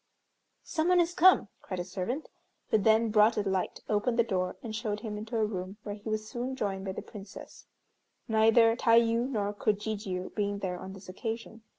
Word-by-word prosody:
"Some 320 -1 -1
one 360 0 +5
is 345 0 +2
come," 360 - +5
cried 185 - -5
a - - -1
servant, 195 - -4 0.4
who 220 - +5
then 220 +2 +3
brought 215 +1 +5
a 205 -1 0
light, 190 -1 -1
opened 225 +3 +1
the 235 - +5
door, 185 -5 -1
and 220 -2 -5
showed 215 -2 -3
him 215 -2 -5
into 220 +3 -4
a 220 - +3
room 190 -1 -5
where 205 - -4
he 205 +1 -7
was 215 0 -2
soon 250 +3 -4
joined 195 -5 -3
by 190 - -3
the - - -6
Princess, 200 -2 -11 0.6
neither 225 +1 +5
Tayû 230 +1 +3
nor 205 -5 -1
Kojijiû 205 -3 -2
being 205 -1 -1
there 180 -3 -3
on 190 +1 -8
this 195 0 -12
occasion. 225 +4 -5
215 Hz, 195 wpm, -30 LUFS, 200-230 Hz, 0.6 s, one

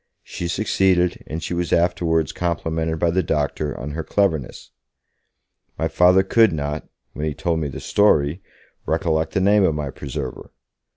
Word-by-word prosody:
She 85 - -5
succeeded, 95 -2 +1
and 80 +1 -5
she - - -3
was 85 -1 -2
afterwards 85 -2 +1
complimented 80 -2 -2
by 85 +1 +1
the 95 +2 +2
doctor 75 -2 -2
on 70 +3 -5
her 80 +2 -4
cleverness. 80 -10 -1 1.1
My 80 - 0
Father 90 +3 +4
could 110 +2 +4
not 75 -1 -4 0.3
when 75 +1 -3
he 75 - -3
told 85 +2 -1
me 75 - -2
the 65 - -7
story 85 -5 +2 0.5
recollect 80 -2 0
the - - +1
name 100 +1 +4
of 80 -5 +2
my 75 -3 -3
preserver. 70 0 -6
80 Hz, 160 wpm, -22 LUFS, 75-90 Hz, 1.1 s, Father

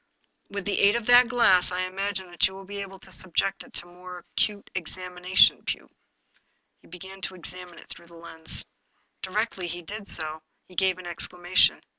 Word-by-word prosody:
" - - -47
With 200 -1 -5
the 205 - 0
aid 200 +2 +5
of 235 -2 -2
that 245 +1 +7
glass 195 -7 +4
I 180 0 -1
imagine 190 0 -3
that 175 - +3
you 190 - -10
will 195 0 -10
be 200 +1 -6
able 195 -1 -8
to 190 0 -12
subject 185 +2 -1
it - - -18
to 175 - -4
a 175 - -17
more 180 0 -10 0.2
acute 205 -1 0
examination, 180 +1 +2
Pugh." - - -4 0.9
He - - -21
began 190 +3 -11
to 190 - -4
examine 180 0 -7
it - - -12
through 170 - -11
the 170 - -16
lens. 165 -1 0 0.6
Directly 190 -1 -2
he 175 +1 -6
did 205 +4 -7
so, 155 0 0 0.3
he 185 - -16
gave 185 0 +2
an 185 - -10
exclamation. 175 +1 +2
185 Hz, 195 wpm, -26 LUFS, 175-195 Hz, 0.9 s, that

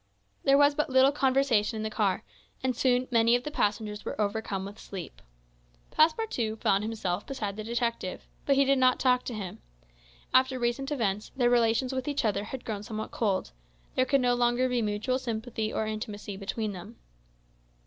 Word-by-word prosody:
There 275 0 +5
was 285 0 +5
but 300 +1 -1
little 260 +1 +5
conversation 265 -6 +2
in 215 - -3
the 220 - -3
car, 210 -1 0 0.4
and 255 -1 0
soon 250 0 +2
many 230 0 +5
of 245 - -1
the 300 - -5
passengers 210 -4 -1
were - - -5
overcome 200 -2 -1
with 205 +2 -9
sleep. 190 -4 -8 0.7
Passepartout 310 - +1
found 195 +1 +2
himself 215 -5 -3
beside 215 -8 -4
the 215 - -5
detective; 230 -4 -2 0.2
but 280 - +4
he 275 0 +4
did 275 0 +3
not 255 -1 +4
talk 250 -1 +3
to 240 - -4
him. 195 -4 -6 0.7
After 260 0 +4
recent 250 +3 -1
events, 210 -7 -1
their 245 -2 +3
relations 240 +2 +2
with 260 +1 -3
each 285 -4 0
other 205 -1 0
had 260 +3 -7
grown 210 -3 -3
somewhat 215 0 -5
cold; 200 -5 -1 0.4
there 255 - +2
could 275 0 +2
no 245 -1 +3
longer 245 +1 +2
be 250 -1 0
mutual 215 +4 -1
sympathy 225 -2 -3
or 220 - -1
intimacy 215 -2 -5
between 210 +2 -3
them. 195 +5 -9
235 Hz, 180 wpm, -28 LUFS, 210-260 Hz, 0.7 s, There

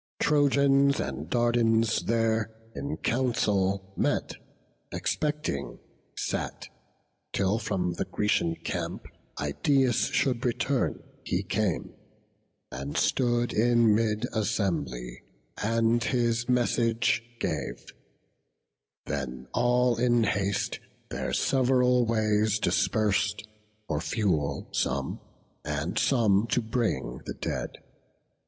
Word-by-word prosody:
Trojans 140 -1 +3
and - - -4
Dardans 115 -2 +2
there 115 -1 +1 0.2
in 145 +2 -4
council 100 -6 0
met - - 0 0.6
Expecting 150 - -2 0.4
sat, - - -3 0.6
till 100 +3 +1
from 90 -5 -1
the - - -3
Grecian 95 -5 0
camp - - -4 0.3
Idaeus 125 - +2
should 125 -3 0
return; 125 +2 0 0.2
he 90 - -1
came, 95 -2 -1 0.8
and 70 +2 -5
stood 120 -1 +1
In 120 -1 +4
mid 110 +1 +1
assembly, 85 - -2 0.4
and 115 +2 +2
his 120 -1 0
message 120 -2 +2 0.2
gave: - - -3 1.2
Then 65 -3 -4
all 125 0 +3
in 120 -1 +3
haste 100 -1 0 0.3
their - - -3
sev'ral 125 -2 +3
ways 110 -1 +2
dispers'd, 105 -1 +1 0.4
For 75 -2 -1
fuel 80 -10 -1
some, 65 0 -1 0.4
and 75 +4 -2
some 110 -5 +3
to 115 - +1
bring 110 - -2
the - - -4
dead. - - -4
115 Hz, 95 wpm, -28 LUFS, 95-120 Hz, 1.2 s, In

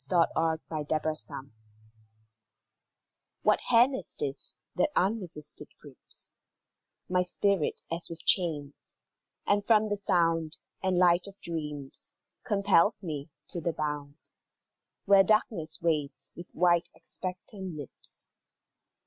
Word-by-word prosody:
SHADOW 175 -3 +3
OF 160 -1 +1
NIGHTMARE 155 -2 -3 1.9
What - - +4
hand 245 +3 +6
is - - -6
this, - - -1 0.2
that - - +3
unresisted 185 -6 -1
grips - - -4 0.7
My 180 0 +2
spirit 180 -1 +1
as 170 +1 -3
with 165 0 -9
chains, 150 -6 0 0.5
and 205 0 +3
from 215 0 +4
the 205 - 0
sound 165 -4 +1 0.2
And 185 -1 +1
light 175 +1 +4
of 200 0 -12
dreams, 150 -5 -5 0.3
compels 200 -3 +3
me 150 -4 -4 0.2
to 175 - -3
the 170 +1 0
bound 150 -1 -3 0.9
Where 200 -1 +8
darkness 180 -7 +1
waits 155 -4 0
with 175 - -9
wide, 175 -1 +3
expectant 185 0 -6
lips? 145 -3 -10
170 Hz, 110 wpm, -30 LUFS, 155-195 Hz, 1.9 s, Where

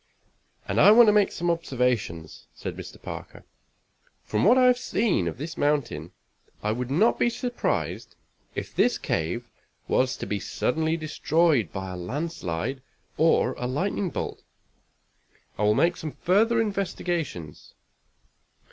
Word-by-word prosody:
"And - - +2
I - - +8
want 235 +3 +8
to - - +4
make 210 -2 +4
some 175 0 0
observations," 125 - -2
said - - -6
Mr. - - -9
Parker. - - -8 0.8
"From 105 - -1
what 240 +5 +6
I 255 - +5
have 250 0 +5
seen 200 - 0
of 85 - -4
this 155 +4 -6
mountain, 140 - 0 0.5
I 105 - +1
would 125 +2 -3
not 200 - +3
be 240 - +3
surprised 245 0 -3 0.4
if - - -5
this - - +3
cave 90 +10 -2 0.4
was 130 0 +1
to - - -5
be 100 +1 -2
suddenly 160 +10 -1
destroyed 155 - +1
by 95 -1 -5
a 90 - -6
landslide 130 - -3 0.3
or 155 -5 +3
a 125 - -2
lightning 180 +8 -1
bolt. - - -5 1.2
I 105 - +2
will 105 0 +4
make 170 +6 +3
some 155 -2 -6
further 220 +6 +2
investigations." 175 - -3
150 Hz, 140 wpm, -26 LUFS, -, 1.2 s, I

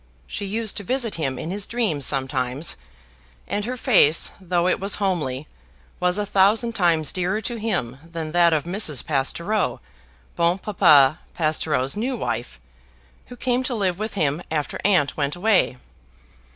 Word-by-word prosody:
She 205 - -5
used 215 +2 -2
to 205 - -5
visit 245 +1 -1
him 135 -5 -2
in 165 - -5
his 200 +1 -2
dreams 200 - 0
sometimes; 130 +1 -1 0.7
and 205 0 -2
her 250 +2 -4
face, 190 - +4
though 175 -1 0
it - - +1
was 195 +1 +1
homely, 155 -9 -2 0.5
was 180 +1 +1
a 210 - -1
thousand 205 +4 +3
times 165 -6 +1
dearer 185 +3 -1
to 235 +3 -4
him 175 - -2
than 165 -2 -6
that 170 0 +4
of 155 -3 +1
Mrs. 170 - -1
Pastoureau, 170 +8 -1 0.6
Bon 170 +2 +2
Papa 155 -7 +4 0.2
Pastoureau's 155 -4 0
new 245 +4 -2
wife, 120 - -4 0.7
who 245 - -10
came 245 +1 0
to 255 -1 -2
live 190 -4 -1
with 215 0 -4
him 150 -3 0
after 150 -2 -3
aunt 180 -8 +2
went 145 +1 -1
away. 185 - +2
175 Hz, 155 wpm, -23 LUFS, 150-210 Hz, 0.7 s, face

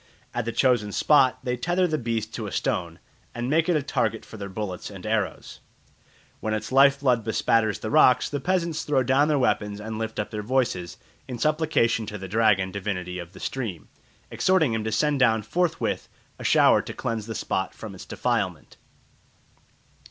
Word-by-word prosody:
At 120 -2 -2
the 115 - -2
chosen 120 -5 +2
spot 130 +1 +4
they 125 -1 -1
tether 175 +9 +1
the 155 -3 -1
beast 115 -2 -3
to 110 -3 -4
a - - -6
stone, 85 +1 -2 0.4
and 120 +3 -2
make 160 +2 +2
it 175 - +3
a 150 - +1
target - - -1
for - - -12
their 100 -2 -6
bullets 95 -2 -5
and 95 -2 -10
arrows. 110 -3 -2 0.8
When 110 0 -1
its 110 +2 -5
life 140 +1 +5
blood 125 -5 +2
bespatters 110 0 +1
the 110 - -4
rocks, 130 -5 +5
the 145 - -3
peasants 170 -1 0
throw 135 -3 +1
down 135 +4 +3
their 150 -1 +2
weapons 105 -5 0
and 110 +1 -5
lift 110 0 -4
up 105 - -3
their 105 -1 -3
voices 105 -7 -1 0.3
in 125 - -5
supplication 150 -7 +1
to 105 - -5
the 95 -1 -7
dragon 100 -2 +2
divinity 90 -2 -4
of 85 +1 -9
the - - -12
stream, 110 -11 -5 0.4
exhorting 170 -10 +2
him 110 -1 -1
to 110 - -1
send 145 +5 +1
down 115 -4 +3
forthwith 170 +7 -1 0.3
a - - -7
shower - - +5
to - - -8
cleanse 110 -2 -3
the 115 - -5
spot - - -2
from - - -8
its - - -10
defilement. - - -2
115 Hz, 190 wpm, -25 LUFS, 105-140 Hz, 0.8 s, life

